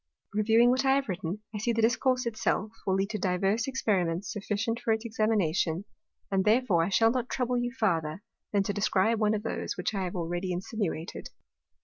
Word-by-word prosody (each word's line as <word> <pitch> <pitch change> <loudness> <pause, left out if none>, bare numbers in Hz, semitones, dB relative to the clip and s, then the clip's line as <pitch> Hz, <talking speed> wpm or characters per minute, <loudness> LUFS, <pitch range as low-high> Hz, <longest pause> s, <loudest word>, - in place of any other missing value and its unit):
Reviewing 225 +3 +4
what 260 +1 +2
I 270 0 +4
have 275 -1 0
written, 185 +2 -4
I 210 - -3
see 235 +3 0
the 230 - +1
Discourse 255 +2 +2
it 235 -2 -2
self 215 -1 0 0.2
will 190 - +3
lead 195 +2 0
to 215 - -3
divers 195 +5 +1
Experiments 190 -8 0
sufficient 210 +3 -2
for 225 - -1
its 220 +1 -3
Examination; 200 -6 0 0.5
and 190 -1 +2
therefore 210 -6 +3
I 170 - -1
shall 225 +4 +4
not 250 0 -2
trouble 250 -1 0
you 245 0 -1
farther, 180 -7 -1 0.3
than 200 -2 +2
to 205 - -2
describe 210 +2 +2
one 215 0 +2
of 210 - -4
those, 225 - -3
which - - -2
I 195 -2 -1
have 180 - -5
already 175 +1 -2
insinuated. 180 -3 -4
210 Hz, 200 wpm, -29 LUFS, 190-230 Hz, 0.5 s, Reviewing